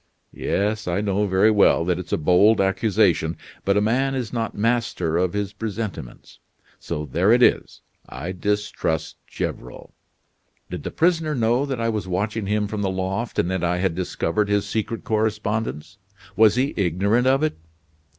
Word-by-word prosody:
"Yes, 105 Hz, +1 st, -1 dB
I 90 Hz, +2 st, 0 dB
know 105 Hz, 0 st, 0 dB
very 95 Hz, +3 st, +4 dB
well 100 Hz, -5 st, +4 dB
that 90 Hz, 0 st, 0 dB
it's 90 Hz, -, -8 dB
a -, -, +2 dB
bold 90 Hz, +7 st, +4 dB
accusation, 95 Hz, -4 st, +2 dB, 0.3 s
but 100 Hz, +1 st, +2 dB
a -, -, +3 dB
man 130 Hz, +5 st, +1 dB
is 125 Hz, -3 st, -4 dB
not 115 Hz, -2 st, -3 dB
master 115 Hz, -7 st, 0 dB
of 90 Hz, -1 st, 0 dB
his 105 Hz, -1 st, -2 dB
presentiments: 105 Hz, -, -6 dB, 0.4 s
so 75 Hz, -, -4 dB
there 85 Hz, -, +2 dB
it 125 Hz, +1 st, +5 dB
is, -, -, +2 dB, 0.3 s
I 85 Hz, +8 st, -5 dB
distrust 105 Hz, -3 st, -2 dB
Gevrol. -, -, -6 dB, 0.8 s
Did -, -, -5 dB
the -, -, -4 dB
prisoner 165 Hz, -3 st, +1 dB
know 120 Hz, +3 st, +1 dB
that 135 Hz, -3 st, -3 dB
I 115 Hz, 0 st, 0 dB
was 105 Hz, -4 st, -3 dB
watching 100 Hz, +3 st, -2 dB
him 105 Hz, +1 st, +1 dB
from 105 Hz, 0 st, -4 dB
the 100 Hz, -, 0 dB
loft, 95 Hz, +5 st, -3 dB
and 90 Hz, -, +1 dB
that 95 Hz, -2 st, -2 dB
I 85 Hz, +1 st, +1 dB
had 95 Hz, -1 st, 0 dB
discovered 90 Hz, +3 st, -1 dB
his 105 Hz, -1 st, +1 dB
secret 110 Hz, +1 st, -3 dB
correspondence, 105 Hz, -4 st, -2 dB, 0.4 s
was 110 Hz, -1 st, +5 dB
he 130 Hz, +3 st, 0 dB
ignorant 100 Hz, +6 st, +1 dB
of 135 Hz, +3 st, +3 dB
it? 155 Hz, -, -1 dB
105 Hz, 170 wpm, -23 LUFS, 95-115 Hz, 0.8 s, it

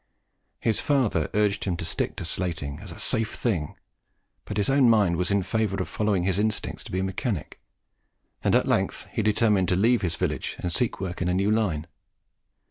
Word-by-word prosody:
His 110 Hz, -3 st, +1 dB
father 120 Hz, -, +1 dB
urged 105 Hz, -1 st, +2 dB
him 90 Hz, -3 st, -1 dB
to 85 Hz, -, -4 dB
stick 80 Hz, -, -1 dB
to -, -, -5 dB
slating 80 Hz, -6 st, -3 dB
as -, -, -8 dB
"a -, -, -9 dB
safe 110 Hz, -1 st, 0 dB
thing;" 90 Hz, -11 st, -1 dB, 0.7 s
but 105 Hz, -, -5 dB
his 100 Hz, -, +2 dB
own 135 Hz, -2 st, +5 dB
mind 105 Hz, -6 st, +4 dB
was 90 Hz, +1 st, 0 dB
in 100 Hz, -1 st, +2 dB
favour 105 Hz, +1 st, 0 dB
of 95 Hz, -, -2 dB
following 105 Hz, -4 st, 0 dB
his 95 Hz, +1 st, +1 dB
instinct 110 Hz, +1 st, -2 dB
to -, -, -10 dB
be 95 Hz, -, -1 dB
a -, -, -1 dB
mechanic; 95 Hz, -, -3 dB, 0.8 s
and -, -, +3 dB
at -, -, +3 dB
length -, -, 0 dB
he -, -, -1 dB
determined 105 Hz, -3 st, +3 dB
to 90 Hz, -, +3 dB
leave 115 Hz, +6 st, +3 dB
his 85 Hz, -3 st, -1 dB
village 75 Hz, -7 st, -2 dB
and 90 Hz, -, -3 dB
seek 125 Hz, -, 0 dB
work 95 Hz, -1 st, -4 dB
in 90 Hz, -, 0 dB
a 90 Hz, -, +1 dB
new 100 Hz, +3 st, +2 dB
line. 95 Hz, -9 st, 0 dB
100 Hz, 205 wpm, -26 LUFS, 90-110 Hz, 0.8 s, own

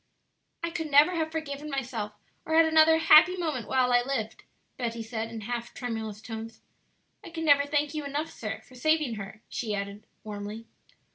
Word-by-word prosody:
"I 335 Hz, -, -1 dB
could 320 Hz, -2 st, -4 dB
never 290 Hz, +4 st, +6 dB
have 320 Hz, -3 st, -1 dB
forgiven 300 Hz, -2 st, -5 dB
myself 240 Hz, -6 st, -3 dB, 0.3 s
or 320 Hz, -, -1 dB
had 325 Hz, 0 st, +7 dB
another 320 Hz, 0 st, +6 dB
happy 325 Hz, +3 st, +7 dB
moment 305 Hz, -, -2 dB
while 255 Hz, -1 st, +2 dB
I 245 Hz, -, +5 dB
lived," 245 Hz, -4 st, -3 dB, 0.3 s
Betty 235 Hz, -2 st, -3 dB
said, 225 Hz, 0 st, -4 dB
in 225 Hz, -1 st, -7 dB
half 235 Hz, +2 st, -5 dB
tremulous 220 Hz, -3 st, -5 dB
tones, 225 Hz, 0 st, -7 dB, 0.6 s
"I -, -, -9 dB
can 325 Hz, -1 st, -4 dB
never 285 Hz, -1 st, +5 dB
thank 295 Hz, 0 st, 0 dB
you 305 Hz, -1 st, -3 dB
enough, 290 Hz, +3 st, -3 dB
sir, 220 Hz, -1 st, -5 dB
for 255 Hz, -, -20 dB
saving 305 Hz, 0 st, +1 dB
her," 210 Hz, +2 st, -9 dB
she 215 Hz, -3 st, -3 dB
added, 200 Hz, +2 st, -6 dB, 0.2 s
warmly. 210 Hz, +1 st, -6 dB
255 Hz, 180 wpm, -28 LUFS, 220-310 Hz, 0.6 s, had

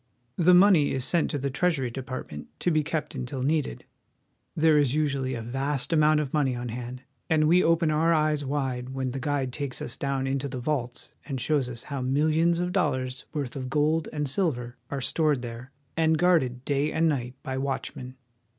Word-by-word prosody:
The 180 Hz, +1 st, +6 dB
money 180 Hz, -6 st, +5 dB
is 130 Hz, -1 st, 0 dB
sent 170 Hz, -2 st, +1 dB
to 145 Hz, -, -2 dB
the 140 Hz, 0 st, -2 dB
Treasury 140 Hz, -6 st, 0 dB
Department 130 Hz, -, -6 dB
to 175 Hz, -, +2 dB
be 155 Hz, -1 st, +3 dB
kept 155 Hz, 0 st, -3 dB
until 130 Hz, -1 st, -4 dB
needed. 145 Hz, -, -1 dB, 0.7 s
There 155 Hz, -1 st, +4 dB
is 140 Hz, -2 st, +2 dB
usually 140 Hz, -4 st, 0 dB
a 115 Hz, -, -5 dB
vast 135 Hz, +5 st, -2 dB
amount 155 Hz, -1 st, +4 dB
of 145 Hz, -3 st, -3 dB
money 140 Hz, -5 st, +1 dB
on 120 Hz, 0 st, -4 dB
hand, 125 Hz, +2 st, -6 dB, 0.3 s
and 155 Hz, -1 st, +3 dB
we 180 Hz, +3 st, +5 dB
open 165 Hz, -1 st, +3 dB
our 160 Hz, +2 st, +3 dB
eyes 155 Hz, -2 st, +2 dB
wide 130 Hz, -2 st, -3 dB
when 130 Hz, -1 st, -2 dB
the 135 Hz, -, -4 dB
guide 140 Hz, -3 st, -1 dB
takes 140 Hz, -3 st, -3 dB
us 120 Hz, -, -5 dB
down 140 Hz, -1 st, -2 dB
into 135 Hz, +1 st, -1 dB
the 130 Hz, -, -5 dB
vaults 125 Hz, -2 st, -3 dB, 0.2 s
and 135 Hz, -3 st, -3 dB
shows 135 Hz, 0 st, +1 dB
us 120 Hz, -1 st, -6 dB
how 140 Hz, -2 st, -4 dB
millions 155 Hz, +6 st, +2 dB
of 180 Hz, 0 st, -1 dB
dollars' 130 Hz, -8 st, -1 dB
worth 145 Hz, -4 st, -4 dB
of 130 Hz, -2 st, -4 dB
gold 155 Hz, +3 st, +1 dB
and 150 Hz, -1 st, -2 dB
silver 130 Hz, -6 st, -1 dB
are 140 Hz, -1 st, -3 dB
stored 150 Hz, -2 st, +1 dB
there, 120 Hz, +2 st, -7 dB, 0.2 s
and 160 Hz, -1 st, +3 dB
guarded 135 Hz, -8 st, +2 dB
day 145 Hz, +1 st, +1 dB
and 165 Hz, +1 st, +2 dB
night 125 Hz, -5 st, -1 dB
by 130 Hz, -, -3 dB
watchmen. 130 Hz, -1 st, -4 dB
140 Hz, 195 wpm, -27 LUFS, 130-155 Hz, 0.7 s, The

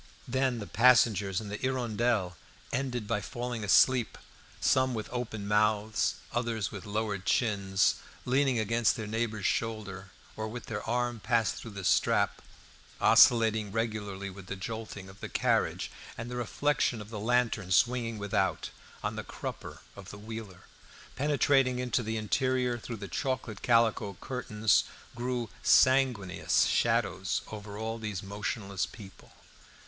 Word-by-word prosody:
Then 130 Hz, 0 st, +1 dB
the 105 Hz, -, -5 dB
passengers 110 Hz, -6 st, +4 dB
in 105 Hz, -, -7 dB
the 105 Hz, -, -4 dB
"Hirondelle" 120 Hz, -7 st, 0 dB, 0.4 s
ended 125 Hz, -3 st, -2 dB
by 105 Hz, -2 st, 0 dB
falling 120 Hz, +2 st, -4 dB
asleep, 120 Hz, +4 st, +4 dB, 0.4 s
some 130 Hz, -1 st, +2 dB
with 110 Hz, -1 st, -4 dB
open 110 Hz, -4 st, -4 dB
mouths, 105 Hz, +1 st, +2 dB, 0.2 s
others 115 Hz, -3 st, -1 dB
with 105 Hz, +1 st, -8 dB
lowered 105 Hz, -2 st, -2 dB
chins, 100 Hz, -2 st, +2 dB, 0.3 s
leaning 130 Hz, 0 st, +2 dB
against 115 Hz, +1 st, +2 dB
their 110 Hz, -4 st, -5 dB
neighbour's 110 Hz, -1 st, -2 dB
shoulder, 100 Hz, -4 st, -2 dB, 0.3 s
or 110 Hz, 0 st, -3 dB
with 120 Hz, +2 st, -7 dB
their 110 Hz, -, -4 dB
arm 120 Hz, -1 st, 0 dB
passed 115 Hz, 0 st, +1 dB
through 115 Hz, -, -9 dB
the 95 Hz, -, -5 dB
strap, -, -, +2 dB, 0.6 s
oscillating 110 Hz, -3 st, +5 dB
regularly 105 Hz, -3 st, -3 dB
with 95 Hz, 0 st, -12 dB
the 95 Hz, -, -4 dB
jolting 105 Hz, -1 st, -6 dB
of 95 Hz, +2 st, -14 dB
the -, -, -6 dB
carriage; -, -, 0 dB, 0.3 s
and 120 Hz, +2 st, -6 dB
the -, -, -4 dB
reflection 125 Hz, +1 st, 0 dB
of 105 Hz, +1 st, -10 dB
the 105 Hz, -, -5 dB
lantern 115 Hz, -3 st, +1 dB
swinging 120 Hz, +2 st, +2 dB
without, 100 Hz, -1 st, -1 dB, 0.3 s
on -, -, -2 dB
the -, -, -4 dB
crupper -, -, -7 dB
of 100 Hz, -1 st, -11 dB
the 100 Hz, -, -9 dB
wheeler; 110 Hz, -3 st, -8 dB, 0.5 s
penetrating 135 Hz, -2 st, +2 dB
into 125 Hz, 0 st, 0 dB
the 110 Hz, -1 st, -3 dB
interior 125 Hz, +2 st, 0 dB
through 115 Hz, 0 st, -6 dB
the 100 Hz, -1 st, -7 dB
chocolate 130 Hz, -5 st, -3 dB
calico 115 Hz, -4 st, +2 dB
curtains, 110 Hz, -5 st, +1 dB, 0.3 s
threw 120 Hz, -2 st, -3 dB
sanguineous 130 Hz, -8 st, +3 dB
shadows -, -, +1 dB
over 105 Hz, -1 st, -7 dB
all 110 Hz, +1 st, -3 dB
these 105 Hz, -4 st, -4 dB
motionless 100 Hz, -1 st, -3 dB
people. 100 Hz, -5 st, -13 dB
110 Hz, 140 wpm, -30 LUFS, 105-120 Hz, 0.6 s, oscillating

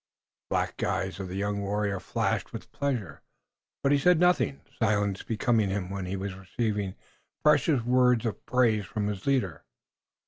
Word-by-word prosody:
The -, -, 0 dB
black -, -, -1 dB
eyes 95 Hz, +1 st, -1 dB
of 95 Hz, -, -4 dB
the 90 Hz, -, -6 dB
young 100 Hz, +1 st, -1 dB
warrior 100 Hz, -1 st, -1 dB
flashed -, -, -1 dB
with -, -, -8 dB
pleasure, 120 Hz, -, -3 dB, 0.6 s
but 140 Hz, -, +3 dB
he 145 Hz, -, +4 dB
said 180 Hz, +3 st, +4 dB
nothing, 180 Hz, -5 st, +2 dB, 0.2 s
silence 105 Hz, -3 st, +1 dB
becoming 110 Hz, -2 st, +1 dB
him 95 Hz, -1 st, -2 dB
when 95 Hz, -2 st, -4 dB
he 95 Hz, -, -2 dB
was 95 Hz, 0 st, -4 dB
receiving 100 Hz, +1 st, -2 dB, 0.5 s
precious 150 Hz, -3 st, +4 dB
words 125 Hz, -1 st, +3 dB
of 110 Hz, -, -3 dB
praise 115 Hz, -5 st, +3 dB
from 105 Hz, 0 st, -2 dB
his 105 Hz, +3 st, -4 dB
leader. 110 Hz, -, 0 dB
105 Hz, 165 wpm, -28 LUFS, 95-125 Hz, 0.6 s, he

